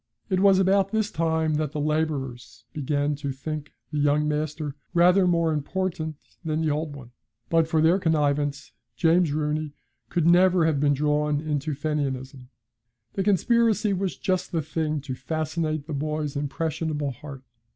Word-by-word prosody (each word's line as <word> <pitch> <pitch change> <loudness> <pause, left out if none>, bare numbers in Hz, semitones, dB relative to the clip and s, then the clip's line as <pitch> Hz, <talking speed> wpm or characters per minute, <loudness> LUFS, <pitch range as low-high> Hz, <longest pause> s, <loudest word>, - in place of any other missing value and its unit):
It 185 - +2
was 195 -1 +6
about 195 +1 +3
this 215 -1 0
time 160 -1 +1
that 155 -1 -2
the 150 - -3
labourers 150 -5 -2
began 145 0 0
to 140 -1 -3
think 150 +2 -5 0.2
the 150 - -1
young 145 +1 +2
master 150 -1 -2 0.2
rather 180 +2 +5
more 170 -2 +2
important 160 +1 -2 0.3
than 155 -1 -1
the 155 -2 +1
old 150 0 -2
one; 125 -4 -11 0.4
but 165 -1 +4
for 160 -1 +2
their 170 +4 +4
connivance, 145 -4 0 0.2
James 170 -1 +3
Rooney 150 0 -2 0.3
could 170 -3 0
never 175 0 +5
have 155 -3 +1
been 145 0 +3
drawn 150 +1 +1
into 150 -1 -2
Fenianism. 135 -3 -3 0.6
The 195 - -1
conspiracy 215 +1 +2
was 185 -6 -2
just 185 +3 -1
the 165 -3 -1
thing 155 -1 -2
to 135 -2 -5
fascinate 155 +1 -2
the 155 - -6
boy's 150 0 -2
impressionable 150 0 -2
heart. 135 +1 -10
155 Hz, 155 wpm, -25 LUFS, 145-170 Hz, 0.6 s, was